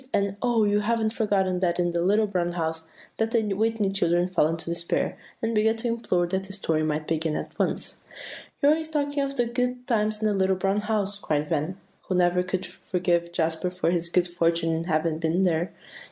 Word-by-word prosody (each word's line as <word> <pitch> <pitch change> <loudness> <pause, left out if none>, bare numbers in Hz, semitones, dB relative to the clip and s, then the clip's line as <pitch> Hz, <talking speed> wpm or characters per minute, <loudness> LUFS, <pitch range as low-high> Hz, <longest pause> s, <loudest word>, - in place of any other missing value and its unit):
and 200 0 0
"Oh! 240 -3 +3
you 205 0 +3
haven't 220 +1 0
forgotten 195 -5 +1
that 175 -1 +1
in 175 -1 +2
The 170 0 0
Little 205 +5 +3
Brown 180 -4 -1
House!" 160 -1 -2 0.3
that 225 0 +1
the 220 -3 +1
Whitney 215 -1 +1
children 175 -2 +2
fell 180 -4 +2
into 165 0 -2
despair, 170 0 -1 0.3
and 225 +1 0
began 220 +1 +3
to 225 +2 -3
implore 225 -7 0
that 190 +2 -2
the 195 - -9
story 165 -5 0
might 155 0 -1
begin 160 -1 0
at - - -4
once. - - -1 0.6
"You're 285 - +7
always 315 0 0
talking 290 -2 0
of 275 0 -2
the 245 -2 +2
good 250 +1 -2
times 215 -3 0
in 215 - +1
The 210 - +2
Little 190 -1 +2
Brown 195 +2 +1
House," 205 -1 -1
cried 150 -5 -1
Van, 165 +3 -1 0.3
who 185 - 0
never 180 0 +3
could 185 +1 -2
forgive 175 -1 -1
Jasper 165 +1 0
for 180 -2 0
his 170 -1 0
good 180 0 +2
fortune 165 -1 +1
in 165 +1 -2
having 160 -1 0
been 165 +3 +1
there. 170 -1 +1
185 Hz, 210 wpm, -26 LUFS, 170-215 Hz, 0.6 s, You're